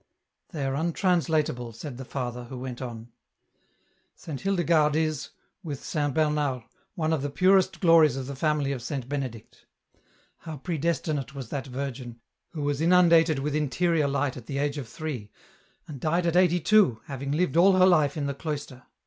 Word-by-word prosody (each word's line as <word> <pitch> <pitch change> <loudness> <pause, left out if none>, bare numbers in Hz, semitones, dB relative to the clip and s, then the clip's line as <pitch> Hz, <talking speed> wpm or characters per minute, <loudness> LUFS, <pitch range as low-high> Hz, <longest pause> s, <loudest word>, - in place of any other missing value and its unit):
" - - -55
They 150 -6 -4
are 135 - -1
untranslatable," 160 - 0
said 125 +3 -8
the 130 - -7
father, 125 -2 -5
who 130 +2 -8
went 125 0 -6
on, 120 -2 -7 0.5
" - - -42
Saint 150 -5 -7
Hildegarde 170 -6 +2
is, 155 -1 -1 0.3
with 145 -5 -6
Saint 145 -4 -2
Bernard, 150 -5 0 0.3
one 160 -3 0
of 155 - 0
the 145 - -2
purest 185 +5 +3
glories 165 -6 +5
of 135 - -4
the 140 +1 -6
family 150 -1 0
of 130 -3 -4
Saint 130 0 -4
Benedict. 130 -6 -6 0.7
How 160 -2 -8
pre 160 +3 -4
destinate 145 -4 -2
was 130 -5 -7
that 135 -1 -4
virgin, 125 -2 -6 0.3
who 155 -3 -4
was 145 0 -1
inundated 165 -2 +5
with 140 +2 -2
interior 155 +2 +1
light 140 -1 -1
at 120 -3 -10
the 140 - -4
age 145 +1 -1
of 125 -5 -8
three, 135 -10 -6 0.6
and 145 -4 -8
died 170 +3 +1
at 170 0 +1
eighty 180 -1 +4
two, 180 - +4
having 140 0 -5
lived 170 +4 0
all 190 +3 +6
her 185 0 +5
life 155 -5 +3
in 145 - -2
the 140 - -2
cloister 145 -3 -6
145 Hz, 185 wpm, -26 LUFS, 135-165 Hz, 0.7 s, all